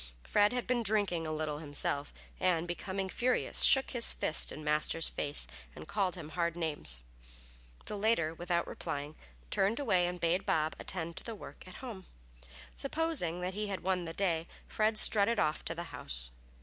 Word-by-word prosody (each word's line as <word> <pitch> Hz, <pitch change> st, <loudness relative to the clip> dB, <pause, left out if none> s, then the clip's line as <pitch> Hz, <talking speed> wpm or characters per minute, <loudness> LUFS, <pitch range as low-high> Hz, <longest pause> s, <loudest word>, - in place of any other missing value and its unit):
Fred 205 Hz, 0 st, +4 dB
had 250 Hz, -1 st, -2 dB
been 245 Hz, -1 st, +1 dB
drinking 200 Hz, -6 st, +1 dB
a -, -, -2 dB
little 155 Hz, -1 st, -2 dB
himself, 145 Hz, -1 st, -2 dB, 0.3 s
and 175 Hz, -2 st, +2 dB
becoming 190 Hz, +2 st, -3 dB
furious, 250 Hz, +6 st, +1 dB
shook 270 Hz, 0 st, +7 dB
his 240 Hz, -3 st, +4 dB
fist 155 Hz, -, +2 dB
in 155 Hz, -, -7 dB
Master's 150 Hz, +2 st, +1 dB
face 145 Hz, 0 st, 0 dB, 0.3 s
and -, -, -9 dB
called 195 Hz, -3 st, 0 dB
him 165 Hz, -4 st, -7 dB
hard 170 Hz, 0 st, -1 dB
names. 145 Hz, -, -2 dB, 0.8 s
The -, -, -5 dB
latter, 200 Hz, -7 st, +2 dB
without 170 Hz, 0 st, -1 dB
replying, 145 Hz, +2 st, -5 dB, 0.4 s
turned 205 Hz, +6 st, +2 dB
away 185 Hz, -10 st, +3 dB
and 180 Hz, 0 st, -4 dB
bade 170 Hz, +2 st, +2 dB
Bob 155 Hz, 0 st, +1 dB
attend 170 Hz, -2 st, -4 dB
to -, -, -4 dB
the 230 Hz, -, -5 dB
work 195 Hz, -, -11 dB
at 185 Hz, -, -10 dB
home. 200 Hz, -7 st, -8 dB, 0.7 s
Supposing 275 Hz, -, 0 dB
that 180 Hz, +1 st, -2 dB
he 210 Hz, +2 st, -2 dB
had 195 Hz, -3 st, -4 dB
won 185 Hz, -2 st, 0 dB
the 165 Hz, -, -5 dB
day, 170 Hz, -3 st, 0 dB, 0.2 s
Fred 215 Hz, 0 st, +1 dB
strutted 215 Hz, +2 st, +5 dB
off 155 Hz, -5 st, +1 dB
to 165 Hz, -, -3 dB
the 170 Hz, -, -4 dB
house. -, -, -4 dB
175 Hz, 175 wpm, -33 LUFS, 160-205 Hz, 0.8 s, shook